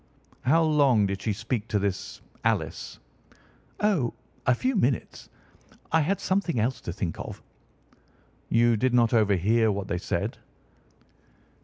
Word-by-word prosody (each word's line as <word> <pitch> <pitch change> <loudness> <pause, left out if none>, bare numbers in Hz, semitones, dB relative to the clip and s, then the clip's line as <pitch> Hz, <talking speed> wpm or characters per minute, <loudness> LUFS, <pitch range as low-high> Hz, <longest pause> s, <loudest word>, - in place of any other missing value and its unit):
"How 165 +6 +4
long 140 -9 +4
did 100 0 -3
she 110 - -1
speak 110 +2 -3
to 110 - 0
this 100 -2 -3 0.2
Alice?" - - -1 0.8
"Oh, 185 - +1 0.3
a 125 - +5
few 260 - -1
minutes. 135 - -1 0.6
I 160 - +4
had 190 +7 0
something 185 - 0
else 120 +3 0
to - - -5
think 85 -2 -4
of." - - -7 1.1
"You 115 0 +4
did 125 +3 +1
not 120 -1 +4
overhear 110 +1 +3
what 100 -1 -3
they 90 - -1
said?" - - -3
115 Hz, 135 wpm, -26 LUFS, 105-145 Hz, 1.1 s, a